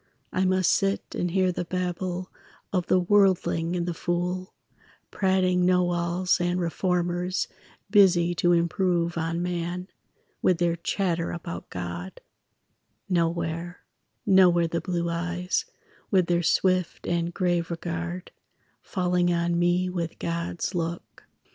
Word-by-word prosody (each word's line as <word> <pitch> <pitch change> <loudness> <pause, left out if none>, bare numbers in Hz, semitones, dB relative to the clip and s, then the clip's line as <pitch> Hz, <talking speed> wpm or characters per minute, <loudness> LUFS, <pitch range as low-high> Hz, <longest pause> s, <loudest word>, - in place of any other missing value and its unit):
I 185 - +1
must 185 -1 +3
sit 195 0 0
and 180 - -1
hear 185 +1 +2
the 180 - -3
babble 180 +1 -3 0.4
Of 180 -2 0
the - - +4
worldling 180 -3 +2
and 175 -1 -1
the 175 - -2
fool, 180 +2 -2 0.6
Prating 185 -2 +2
know 180 0 +3
alls 175 +1 +1
and 175 +1 0
reformers 180 +1 0 0.4
Busy 180 -4 +5
to 175 0 +2
improve 170 0 +1
on 165 +1 -1
man, 180 +1 -3 0.5
With 180 - +3
their 170 -1 +1
chatter 170 0 -1
about 170 0 -6
God; 90 +1 -6 0.9
Nowhere, 170 0 -1 0.4
nowhere 180 -4 +5
the 170 +1 -2
blue 175 -2 -2
eyes, 175 +2 -1 0.4
With 185 -3 +3
their 170 0 +1
swift 185 +1 +1
and 170 0 0
grave 175 -2 0
regard, 175 +1 -4 0.5
Falling 180 -2 +1
on 170 0 +1
me 175 +1 +2
with 170 -3 -3
God's 170 +2 -3
look. 170 -1 -4
175 Hz, 125 wpm, -26 LUFS, 170-185 Hz, 0.9 s, Busy